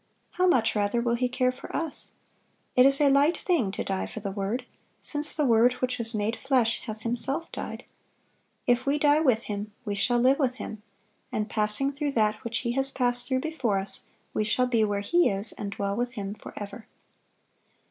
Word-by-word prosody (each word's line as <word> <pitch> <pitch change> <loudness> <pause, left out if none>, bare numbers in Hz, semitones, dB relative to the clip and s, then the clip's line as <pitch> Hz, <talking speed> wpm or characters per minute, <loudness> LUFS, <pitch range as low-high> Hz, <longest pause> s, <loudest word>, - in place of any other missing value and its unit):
How 365 0 +2
much 245 -11 +3
rather 205 +3 +1
will 235 0 +1
He 250 +1 0
care 255 0 +1
for 255 - -9
us! 325 -2 -3 0.6
It 250 +1 +7
is 275 0 +5
a 295 - +5
light 280 +4 +4
thing 320 - +1
to - - -2
die 190 -1 -2
for - - -7
the 200 -2 -4
Word, 205 +6 -3 0.3
since 295 0 +1
the 300 - +1
Word 235 0 +5
which 250 0 -2
was 225 0 -1
made 215 +2 0
flesh 255 -4 +1
hath 215 0 -5
Himself 270 +7 -2
died. - - -6 0.8
If 245 +2 +2
we 285 +2 +3
die 295 0 +4
with 250 -7 +2
Him, 205 0 -5
we 205 - -2
shall 240 +5 +2
live 260 +4 +4
with 260 -3 +1
Him; 220 -4 -7 0.5
and 215 0 -2
passing 215 +6 +1
through 285 0 -2
that 215 -3 +1
which 235 +1 -1
He 235 - -1
has 270 +2 +2
passed 245 -2 +1
through 260 0 0
before 260 -10 -1
us, 195 +1 -2 0.3
we 215 - +1
shall 250 +4 +2
be 235 -3 +2
where 205 -1 0
He 345 +12 +3
is 195 +1 -1
and 205 - -5
dwell 200 0 -2
with 245 +2 -2
Him 200 -3 -4
forever." 205 +1 -9
245 Hz, 200 wpm, -27 LUFS, 215-270 Hz, 0.8 s, It